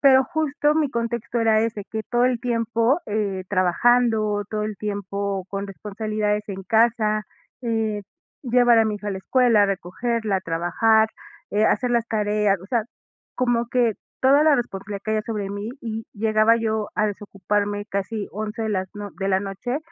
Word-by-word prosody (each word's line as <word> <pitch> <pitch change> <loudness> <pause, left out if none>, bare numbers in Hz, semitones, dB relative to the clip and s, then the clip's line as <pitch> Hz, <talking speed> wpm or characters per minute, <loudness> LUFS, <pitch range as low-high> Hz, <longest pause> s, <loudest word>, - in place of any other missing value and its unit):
Pero 265 -2 +7
justo 300 -2 0
mi 310 -2 +2
contexto 235 -1 -2
era 220 -1 +4
ese, 220 -2 -2
que 220 0 -3
todo 240 0 +2
el 250 -2 +1
tiempo, 235 +3 +1
eh, 205 -3 -2
trabajando, 215 +2 +2
todo 215 -1 -2
el 215 -1 -4
tiempo 200 -1 -3
con 200 +1 -4
responsabilidades 210 +1 -2
en 195 -1 -5
casa, 220 -1 +2 0.4
eh, 225 -3 -1 0.4
llevar 245 -1 +5
a - - +4
mi 215 -1 -1
hija 205 0 -9
a - - -1
la 190 - -4
escuela, 235 +1 +3
a - - +4
recogerla, 200 +3 -1
a - - -2
trabajar, 190 +6 +2 0.4
eh, 210 +1 +2
hacer 245 +2 +2
las 235 -1 +1
tareas, 210 -2 +1
o 185 - -11
sea, 235 +2 +1 0.5
como 240 -2 +1
que 240 -3 +2 0.3
toda 275 +3 +5
la 310 -2 +5
responsabilidad 200 -3 -4
caía 215 0 0
sobre 210 -3 -3
mí 205 +2 -5
y 225 -1 -5
llegaba 215 +1 +3
yo 220 -2 -1
a 215 - +3
desocuparme 205 0 -2
casi 200 +1 -3
11 215 +2 -4
de 220 - -1
las 190 -2 -1
no 205 -1 -6
de 195 -1 -2
la 190 -1 +3
noche, 200 +7 -3
215 Hz, 175 wpm, -23 LUFS, 205-235 Hz, 0.5 s, Pero